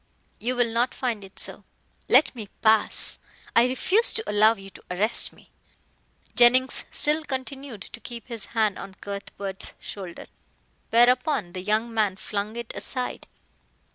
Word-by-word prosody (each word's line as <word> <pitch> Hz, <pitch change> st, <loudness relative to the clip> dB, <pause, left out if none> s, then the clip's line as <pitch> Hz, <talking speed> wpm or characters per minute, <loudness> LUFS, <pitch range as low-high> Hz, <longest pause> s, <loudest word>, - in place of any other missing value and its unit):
"You 250 Hz, +3 st, -1 dB
will 240 Hz, -2 st, +1 dB
not 240 Hz, +2 st, +1 dB
find 235 Hz, -6 st, -2 dB
it 195 Hz, 0 st, -14 dB
so." -, -, -3 dB, 0.5 s
"Let -, -, +5 dB
me 220 Hz, -5 st, -8 dB
pass. 220 Hz, -1 st, +3 dB, 0.4 s
I 235 Hz, +2 st, +6 dB
refuse 375 Hz, -, +2 dB
to 440 Hz, -, -3 dB
allow 215 Hz, +2 st, +5 dB
you 195 Hz, -1 st, -12 dB
to -, -, -15 dB
arrest 200 Hz, +5 st, +3 dB
me." -, -, -21 dB, 0.8 s
Jennings 250 Hz, +2 st, +5 dB
still 305 Hz, +2 st, +2 dB
continued 265 Hz, -5 st, -6 dB
to 240 Hz, -, -9 dB
keep 235 Hz, -1 st, -8 dB
his 230 Hz, -5 st, -7 dB
hand 215 Hz, -3 st, +2 dB
on 195 Hz, -1 st, -9 dB
Cuthbert's 200 Hz, -1 st, -6 dB
shoulder, 185 Hz, -4 st, -8 dB, 0.6 s
whereupon 245 Hz, -, +3 dB
the 185 Hz, -, -5 dB
young 215 Hz, +4 st, 0 dB
man 210 Hz, -4 st, +1 dB
flung 205 Hz, +2 st, -4 dB
it 235 Hz, -1 st, -6 dB
aside. 255 Hz, -2 st, -3 dB
230 Hz, 145 wpm, -25 LUFS, 200-250 Hz, 0.8 s, I